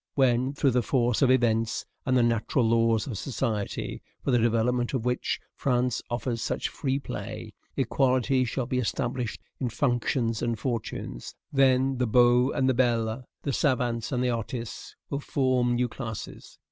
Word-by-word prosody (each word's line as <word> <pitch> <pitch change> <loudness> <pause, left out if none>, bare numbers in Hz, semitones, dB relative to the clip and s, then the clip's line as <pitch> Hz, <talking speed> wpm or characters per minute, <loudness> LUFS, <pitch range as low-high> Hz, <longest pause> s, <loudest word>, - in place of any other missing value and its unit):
When, 130 0 +3
through 140 -1 +3
the 125 0 +2
force 120 -1 +1
of 135 - +5
events, 115 -3 +2 0.2
and 130 0 +3
the 120 - +4
natural 115 +1 +1
laws 115 -1 +3
of 115 -9 -4
society, 110 -6 -3 0.2
for - - 0
the 120 - +4
development 120 +2 +1
of 120 -3 -2
which 125 0 0
France 125 -2 0
offers 120 -1 -2
such - - -1
free 135 -2 -1
play, 140 - -6 0.2
equality 130 0 +2
shall 125 +1 -2
be 125 +1 -1
established 120 0 -2 0.2
in 125 - -1
functions 120 -2 0
and 115 -1 0
fortunes, 115 - -4 0.2
then 135 -1 +3
the 125 - +2
beaux 125 +2 +5
and 130 -2 +1
the 130 - +4
belles, 120 -1 +1 0.2
the 140 - -1
savants 125 -4 0
and 125 -2 0
the 125 - +2
artists, 115 0 -5 0.2
will 140 - -1
form 130 -4 +1
new 125 +1 +1
classes. 110 -2 -7
125 Hz, 160 wpm, -27 LUFS, 115-130 Hz, 0.2 s, of